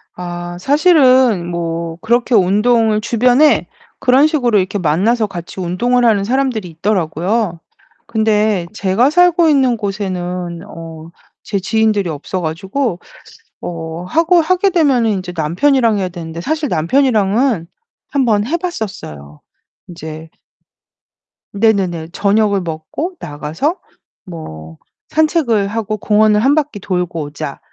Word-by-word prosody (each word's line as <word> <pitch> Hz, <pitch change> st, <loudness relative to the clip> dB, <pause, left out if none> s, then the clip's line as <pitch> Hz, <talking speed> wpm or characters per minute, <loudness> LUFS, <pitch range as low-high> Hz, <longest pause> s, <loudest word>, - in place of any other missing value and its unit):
아 175 Hz, 0 st, -6 dB
사실은 260 Hz, -, +4 dB
뭐 165 Hz, -1 st, -4 dB
그렇게 235 Hz, +2 st, +1 dB
운동을 215 Hz, +3 st, +3 dB
주변에 245 Hz, +6 st, +3 dB, 0.3 s
그런 265 Hz, +4 st, +4 dB
식으로 250 Hz, -8 st, +1 dB
이렇게 190 Hz, +2 st, -2 dB
만나서 200 Hz, +7 st, +1 dB
같이 175 Hz, -1 st, -8 dB
운동을 240 Hz, +8 st, +1 dB
하는 210 Hz, -3 st, +3 dB
사람들이 245 Hz, -3 st, -1 dB
있더라고요. 180 Hz, +2 st, -1 dB, 0.5 s
근데 215 Hz, -4 st, +1 dB
제가 200 Hz, +7 st, +2 dB
살고 350 Hz, +1 st, +4 dB
있는 265 Hz, -5 st, +3 dB
곳에는 180 Hz, -4 st, -4 dB
어 165 Hz, -3 st, -10 dB, 0.3 s
제 205 Hz, -, -2 dB
지인들이 210 Hz, 0 st, +1 dB
없어 160 Hz, +4 st, -4 dB
가지고 180 Hz, -, -2 dB, 0.6 s
어 165 Hz, 0 st, -6 dB
하고 330 Hz, -, +3 dB
하게 370 Hz, +4 st, +2 dB
되면은 250 Hz, -, +2 dB
이제 180 Hz, -1 st, -7 dB
남편이랑 215 Hz, -, +2 dB
해야 185 Hz, -2 st, -2 dB
되는데 165 Hz, -2 st, -7 dB
사실 310 Hz, -, -2 dB
남편이랑은 220 Hz, -, +1 dB, 0.4 s
1 275 Hz, -2 st, +1 dB
번 210 Hz, -3 st, +2 dB
해 315 Hz, +8 st, -1 dB
봤었어요. 190 Hz, -, -6 dB, 0.5 s
인제 160 Hz, -2 st, -9 dB, 1.2 s
네네네. 195 Hz, -6 st, +1 dB
저녁을 200 Hz, 0 st, +2 dB
먹고 170 Hz, -, -5 dB
나가서 155 Hz, -, -3 dB, 0.5 s
뭐 80 Hz, -, -9 dB, 0.3 s
'산책을 305 Hz, -, +1 dB
하고 215 Hz, 0 st, -3 dB
공원을 210 Hz, 0 st, +3 dB
1 270 Hz, +6 st, +3 dB
바퀴 295 Hz, -9 st, -1 dB
돌고 180 Hz, -3 st, -2 dB
오자.' 145 Hz, -1 st, -6 dB
205 Hz, 265 characters per minute, -16 LUFS, 175-250 Hz, 1.2 s, 사실은